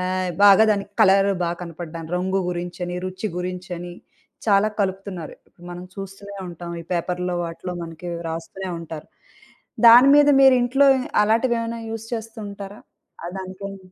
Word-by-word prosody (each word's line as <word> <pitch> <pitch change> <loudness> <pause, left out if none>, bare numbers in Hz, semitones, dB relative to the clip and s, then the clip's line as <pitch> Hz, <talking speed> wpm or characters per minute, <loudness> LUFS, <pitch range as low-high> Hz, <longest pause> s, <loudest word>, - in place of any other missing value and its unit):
ఆహ్, 185 0 -1
బాగా 205 +2 +8
దానికి 200 -1 -1
కలర్ 195 +1 +5
బా 170 - 0
కనపడడం, 165 -1 -7
రంగు 190 +2 0
గురించని, 175 0 -4
రుచి 185 +3 -4
గురించని, 180 -1 -5 0.5
చాలా 205 0 +4
కలుపుతున్నారు. 190 -3 -3 0.4
మనం 175 +1 -7
చూస్తూనే 195 +1 -9
ఉంటాం 170 0 -8
ఈ - - -18
పేపర్‌లో, 180 +1 -2
వాటిలో 170 +2 -6
మనకీ 165 +1 -7 0.2
రాస్తూనే 165 +4 -6
ఉంటారు. 160 -2 -9 0.8
దాని 245 +4 +9
మీద 290 0 +6
మీరింట్లో 265 +1 +5 0.3
అలాటివేమైనా 230 +1 0
యూజ్ 225 0 -6
చేస్తూ 225 0 -7
ఉంటారా? 200 +1 -9 0.4
ఆహ్, 175 - -5
దానికేన్ 190 +1 -7
190 Hz, 130 wpm, -22 LUFS, 175-205 Hz, 0.8 s, దాని